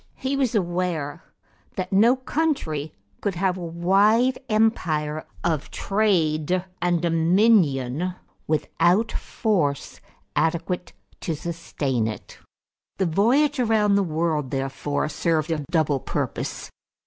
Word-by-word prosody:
He 265 +1 -2
was 260 -4 0
aware 175 -5 -1 0.5
that 185 +1 -3
no 225 +6 +5
country 260 - -2 0.3
could 200 -3 -1
have 185 +1 +1
a 185 - -7
wide 200 +9 +3
empire 155 -9 +1 0.2
of 160 -4 -1
trade 180 -4 +1 0.2
and 175 -1 +2
dominion 170 - +2 0.3
without 175 +7 +2
force 175 - -1 0.3
adequate 170 +2 -1 0.3
to 165 - -2
sustain 145 -7 -2
it. 110 - -8 0.6
The 190 - +1
voyage 255 - +2
around 220 -4 +3
the 200 - +4
world 160 -5 -1
therefore 135 +2 -2
served 160 +1 0
a 155 -2 -1
double 155 -5 +1
purpose. - - -4
175 Hz, 110 wpm, -24 LUFS, 155-210 Hz, 0.6 s, no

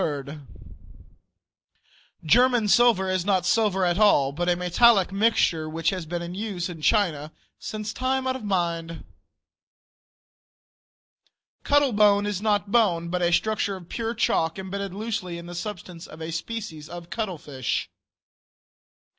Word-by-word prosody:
German 245 +4 +4
silver 230 -3 +4
is 185 -1 0
not 190 -2 +1
silver 200 -3 +2
at 175 +2 0
all, 145 -10 +4
but 175 +5 -2
a 175 - +3
metallic 190 +3 +4
mixture 195 -6 +1
which 165 +1 0
has 185 -4 -5
been 175 +1 -4
in 170 +1 -6
use 190 -3 -4
in 165 -3 -9
China 155 -6 +1 0.6
time 260 +1 -1
out 260 0 0
of 260 - -7
mind. 170 -4 -2 2.6
Cuttle 285 -3 +3
bone 205 -1 +4
is 205 -2 -3
not 205 -2 0
bone, 175 -8 +2
but 180 +1 -2
a 175 0 +2
structure 210 +1 0
of 175 -3 -12
pure 230 0 -3
chalk 165 -6 0
imbedded 195 +1 -5
loosely 210 -5 -4
in 170 - -9
the 175 - -8
substance 175 -2 -7
of 155 - -12
a 160 +1 -5
species 165 -4 -6
of 175 -1 -9
cuttlefish. 170 - -3
190 Hz, 135 wpm, -25 LUFS, 170-215 Hz, 2.6 s, German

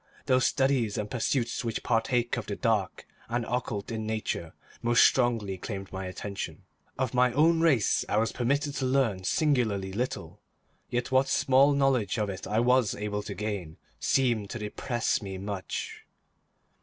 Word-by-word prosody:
Those 130 0 +3
studies 130 -6 +1
and 105 0 -3
pursuits 120 0 -1
which 115 -1 -3
partake 120 +1 +1
of 120 -5 -5
the 100 - -3
dark 110 -6 -1 0.2
and 120 0 -1
occult 120 -4 -3
in 110 -1 -3
nature 110 -6 -3 0.3
most 120 0 +5
strongly 115 -7 +1
claimed 95 -1 -6
my 95 0 -4
attention. 100 +2 -6 0.3
Of 130 0 -1
my 125 0 +4
own 160 +4 +4
race 140 -11 +3
I - - +1
was 110 +1 +2
permitted 140 +4 0
to 135 - -1
learn 125 -8 +1
singularly 115 - +1
little, 125 +5 -4 0.5
yet 125 +1 -2
what 130 +1 +4
small 135 +2 +4
knowledge 135 -7 +2
of 105 -2 0
it 95 - -7
I 105 +3 +1
was 125 -2 +3
able 105 0 -3
to - - -7
gain, 100 -7 -4 0.2
seemed 120 -6 +1
to - - -4
depress 115 +3 -1
me 95 -2 -6
much. 100 0 -5
115 Hz, 160 wpm, -28 LUFS, 105-130 Hz, 0.5 s, most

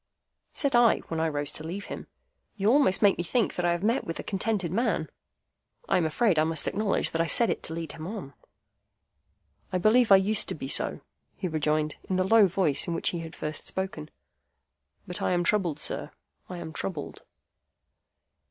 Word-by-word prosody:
Said 280 -4 0
I, 240 -1 +6
when 165 - -2
I 165 - +1
rose 145 -1 0
to 155 - -7
leave 185 +5 -5
him, - - -7 0.5
"You 205 +1 +2
almost 260 -8 +4
make 200 -3 +5
me - - 0
think 230 +5 0
that 180 - -2
I - - +3
have 170 +2 -2
met 230 +5 +2
with 165 - -5
a - - -4
contented 195 -3 -1
man." 230 +7 0 0.8
(I - - +3
am 170 -3 +2
afraid 185 0 +2
I - - +4
must 160 -1 -2
acknowledge 205 0 0
that 165 - 0
I 165 - 0
said 235 +5 +3
it - - -3
to 160 - -6
lead 165 -2 -5
him 160 0 -8
on.) 190 -9 -7 1.4
"I 185 - +1
believe 220 +4 +4
I - - +11
used 195 +2 +2
to - - -2
be 135 - -6
so," - - -1 0.3
he 185 - -3
rejoined, 155 -1 0
in 190 - +1
the 185 - +2
low 210 +1 +6
voice 175 -6 0
in 170 - -1
which - - +1
he 175 - -3
had 165 -1 -8
first 150 0 -5
spoken; 190 -5 -4 1.0
"but 180 - -4
I - - +1
am 175 0 +1
troubled, 175 -5 +1
sir, - - -3 0.4
I 180 - -6
am 165 -2 -7
troubled." 150 - -5
180 Hz, 200 wpm, -27 LUFS, 160-205 Hz, 1.4 s, I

